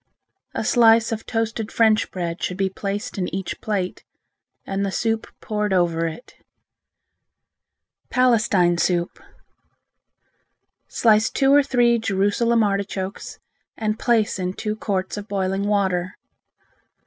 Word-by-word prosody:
A - - -1
slice 230 -2 +4
of 225 -1 -4
toasted 225 -1 -2
French 220 -1 +3
bread 170 -2 -4
should 180 - -3
be 195 -1 0
placed 200 +1 -4
in 180 - -1
each 190 -1 -5
plate, 195 -4 -3 0.6
and 195 +1 -2
the 200 - 0
soup 225 +2 -1
poured 210 -2 -2
over 170 -2 +1
it. 165 +10 -9 1.8
Palestine 225 -9 +3
Soup 175 0 0 1.7
Slice 215 -1 +3
two 270 0 +2
or 290 - +7
three 240 -4 +2
Jerusalem 220 +3 +1
artichokes 195 -1 -3 0.4
and 215 0 -2
place 225 -5 +1
in 180 0 -2
two 210 +1 -3
quarts 195 -2 -3
of 205 0 -7
boiling 195 -1 -1
water. 190 -3 0
205 Hz, 120 wpm, -22 LUFS, 190-225 Hz, 1.8 s, or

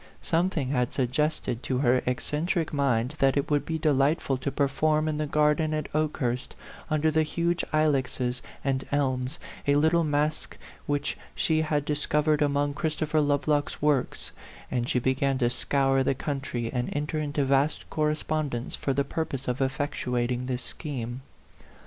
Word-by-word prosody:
Something 165 -5 +1
had 125 -3 0
suggested 130 -2 0
to 130 -1 -1
her 125 -1 +3
eccentric 155 +6 -1
mind 130 -3 +1
that 135 -1 +3
it 140 +2 -1
would 145 -1 +1
be 160 - -1
delightful 145 -1 +2
to 135 +2 -3
perform 150 +3 +1
in 155 -1 -1
the 155 - -1
gar 150 +1 +4
den 155 +1 -1
at 155 -1 -4
Okehurst, 135 -5 -1 0.3
under 155 +1 +2
the 160 +1 +3
huge 170 +2 0
ilexes 130 -5 +1 0.2
and 135 -1 +1
elms, 130 -2 0 0.3
a 140 - +4
little 160 +3 +4
masque 150 0 -1 0.3
which 145 0 -1 0.2
she 160 -1 +2
had 150 -2 0
discov 150 0 0
ered 155 0 +2
among 145 0 +1
Christopher 155 0 0
Lovelock's 145 0 +1
works; 145 -3 0 0.4
and 120 -1 -1
she - - +1
began 130 +2 +1
to 120 -2 +2
scour 135 +2 +2
the 135 +1 +1
country 135 -4 -3
and 125 -1 -1
en 145 +1 -1
ter 155 +1 -2
into 145 -1 0
vast 140 +3 +1
correspondence 150 -4 -1
for 135 - -1
the 140 - +2
purpose 140 -2 -3
of 125 0 -1
effectuating 125 -2 -1
this 125 -1 -2
scheme. 125 -5 -4
145 Hz, 160 wpm, -27 LUFS, 130-155 Hz, 0.4 s, gar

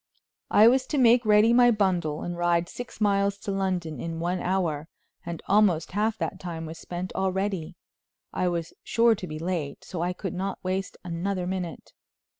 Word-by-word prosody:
I 215 +2 +7
was 260 +2 +3
to 295 - -1
make 240 -2 +5
ready 210 +2 +6
my 245 0 +6
bundle 180 -8 +1
and 175 - -4
ride 175 0 +1
six 245 +2 -8
miles 200 -1 +2
to 200 - -5
London 180 -6 -2
in 165 +4 -4
one 175 +2 -1
hour; 170 -5 -1 0.4
and 170 -2 -6
almost 195 -5 +3
half 215 +3 0
that 190 - -3
time 165 -3 -5
was 160 +1 -8
spent 180 +1 -5
already. 190 -3 -1 0.6
I 180 - 0
was 170 -2 -2
sure 230 0 +4
to 190 -4 -5
be 155 - -6
late, 165 -3 -3
so 175 -3 -5
I 175 +1 0
could 190 0 -5
not 195 +1 -3
waste 190 +1 -2
another 180 +2 -2
minute. 180 -3 -5
185 Hz, 180 wpm, -26 LUFS, 170-205 Hz, 0.6 s, I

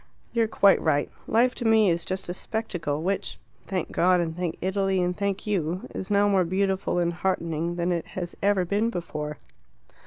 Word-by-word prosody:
You 235 - +2
are - - -3
quite 200 -2 +4
right; 145 -3 +1 0.2
life 245 +3 +3
to - - -5
me 220 -4 +5
is 170 0 -1
just 185 +1 -3
a 175 - -3
spectacle, 175 -8 -3
which 195 +2 -2 0.3
thank 185 -4 -2
God, 180 +1 +3
and 165 -2 -2
thank 175 -2 -3
Italy, 190 0 0
and 180 0 0
thank 200 -1 -2
you 180 -4 -1
is 190 - -5
now 205 0 +4
more 195 -2 +3
beautiful 190 +1 0
and 175 -1 +1
heartening 170 -2 -1
than 175 +1 0
it 170 -2 -1
has 175 -2 -4
ever 200 -2 +2
been 205 +5 +1
before." 150 -6 -4
185 Hz, 190 wpm, -26 LUFS, 170-200 Hz, 0.3 s, me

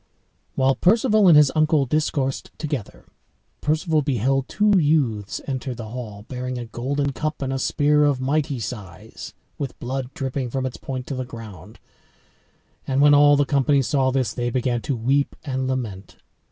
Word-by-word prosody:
While 135 0 +3
Perceval 210 - +3
and 165 -4 +8
his 150 -2 +6
uncle 155 -2 +3
discoursed 135 -1 -1
together, 145 -9 -5 0.6
Perceval 155 +1 +1
beheld 135 0 0
two 205 -1 +3
youths 135 - +1
enter 130 -2 -4
the 110 -2 -8
hall 110 -4 -7
bearing 125 0 -4
a 120 - -5
golden 140 +5 -2
cup 155 +2 -3
and 135 0 -2
a 135 - -2
spear 150 +3 +2
of 140 -3 +1
mighty 140 0 -1
size, 105 -7 -8 0.2
with 140 -3 -4
blood 130 +1 -4
dropping 130 -2 -3
from 130 +2 -2
its 130 - -4
point 130 -2 -5
to 140 - -5
the 130 - -3
ground. 115 -7 -11 1.1
And 135 0 0
when 145 +1 +6
all 145 0 +6
the 145 - +3
company 140 0 +2
saw 135 0 +1
this 130 -4 0
they 120 0 -2
began 120 -1 -1
to 140 +1 -2
weep 135 +5 +1
and 130 -2 -2
lament. 110 -8 -4
135 Hz, 165 wpm, -23 LUFS, 125-145 Hz, 1.1 s, and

